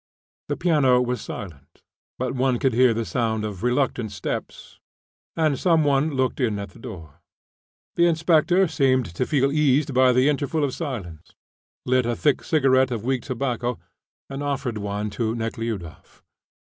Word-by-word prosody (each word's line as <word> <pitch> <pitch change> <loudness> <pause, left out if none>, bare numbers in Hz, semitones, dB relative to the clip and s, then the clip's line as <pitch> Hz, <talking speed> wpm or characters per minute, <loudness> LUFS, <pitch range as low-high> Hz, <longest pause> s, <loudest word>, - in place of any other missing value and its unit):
The - - -2
piano 150 -8 +3
was 125 0 -1
silent, 85 -9 -9 0.3
but 130 0 -2
one 130 -1 +1
could 130 0 +1
hear 125 +1 +5
the 115 0 -2
sound 110 -3 -1
of 100 -4 -6
reluctant 125 -2 0
steps, 100 - -6 0.6
and 155 -4 +1
some 165 -3 +3
one 145 +1 +2
looked 130 +1 0
in 115 -6 0
at 100 0 -6
the - - -17
door. 90 - -10 0.7
The 170 0 +4
inspector 170 +3 +3
seemed 135 -6 +2
to 125 +9 -2
feel 140 -2 +2
eased 145 -1 +2
by 130 0 +5
the 130 +2 +3
interval 150 +1 0
of 135 -3 -1
silence, 95 - -6 0.5
lit 130 -1 +2
a 120 - 0
thick 145 +2 +1
cigarette 135 -4 +3
of 115 -4 -4
weak 130 -1 0
tobacco, 125 -2 -2 0.5
and 135 +1 -6
offered 135 -6 -2
one 105 +1 -3
to 110 +2 -2
Nekhludoff. 115 -6 -6
130 Hz, 160 wpm, -23 LUFS, 115-140 Hz, 0.7 s, hear